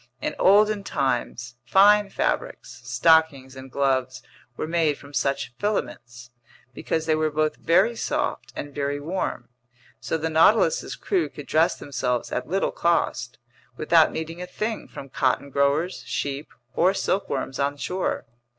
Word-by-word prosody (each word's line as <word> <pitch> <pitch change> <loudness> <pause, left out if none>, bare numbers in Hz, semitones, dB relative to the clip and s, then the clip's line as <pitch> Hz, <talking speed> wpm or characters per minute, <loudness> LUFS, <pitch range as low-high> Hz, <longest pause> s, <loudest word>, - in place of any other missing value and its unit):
In - - -3
olden 205 +1 +4
times, 120 -5 -2
fine 205 +7 +5
fabrics, - - -3
stockings, 160 -5 +2
and 130 0 -10
gloves 130 -2 0 0.3
were - - -2
made 160 -2 +1
from 140 0 -15
such 135 -2 -1
filaments, 120 - -4 0.4
because 160 +5 -2
they 160 - +2
were 155 0 +1
both 155 0 -1
very 190 +8 +3
soft - - -2
and 145 0 -6
very 145 0 -2
warm. 150 -6 -4 0.5
So 160 - -2
the 160 +1 -3
Nautilus's 215 - +3
crew 375 -4 -1
could 145 - -10
dress 165 +3 +2
themselves 125 -3 -2
at - - -3
little 195 +3 0
cost, 120 -8 0 0.4
without 160 +1 +4
needing 165 +2 -5
a 180 - -5
thing 215 +4 -4
from 140 - -10
cotton 140 +1 -1
growers, 140 +6 +1
sheep, 140 +1 -3 0.3
or 185 +3 +3
silkworms 140 -10 -2
on 140 +1 0
shore. 185 +5 -2
155 Hz, 140 wpm, -24 LUFS, 135-180 Hz, 0.5 s, fine